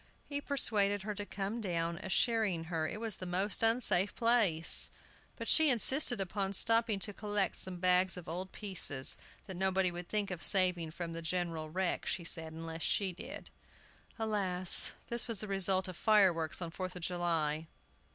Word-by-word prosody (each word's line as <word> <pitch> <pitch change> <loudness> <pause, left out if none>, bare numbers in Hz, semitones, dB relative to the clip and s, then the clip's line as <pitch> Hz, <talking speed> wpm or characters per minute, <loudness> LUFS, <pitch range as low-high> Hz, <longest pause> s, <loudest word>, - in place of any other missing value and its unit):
He 285 0 -4
persuaded 205 -8 0
her 210 +1 -5
to 205 0 -7
come 200 +4 -5
down, 170 -3 -3
assuring 205 -3 -1
her 160 -1 -2
it 210 - -7
was 225 -2 -3
the 185 - -8
most 190 +3 -1
unsafe 225 -4 +1
place; 225 -9 +2 0.5
but - - -8
she 315 -2 +6
insisted 250 -1 +5
upon 195 +1 -3
stopping 225 0 +2
to 200 +2 -4
collect 205 -1 -2
some 185 -1 +4
bags 185 +1 +1
of 180 - -10
old 180 +4 -6
pieces, 180 -10 0 0.3
that 190 -2 -9
nobody 190 -1 0
would 175 0 -9
think 205 -2 -2
of 175 -3 -7
saving 180 -4 +1
from 165 +1 -7
the 165 - -6
general 165 -2 -3
wreck, 185 +2 -3
she 180 - -2
said, 165 -1 -2
unless 165 0 -9
she 190 +1 0
did. 175 - -10 0.7
Alas! 195 -5 +5 0.2
this 235 0 +2
was 230 -5 -2
the 215 - -6
result 190 -1 -1
of 185 - -8
fireworks 180 -5 +1
on 165 - -7
Fourth 185 +1 -7
of 180 - -9
July! 165 -3 -2
190 Hz, 170 wpm, -32 LUFS, 170-210 Hz, 0.7 s, she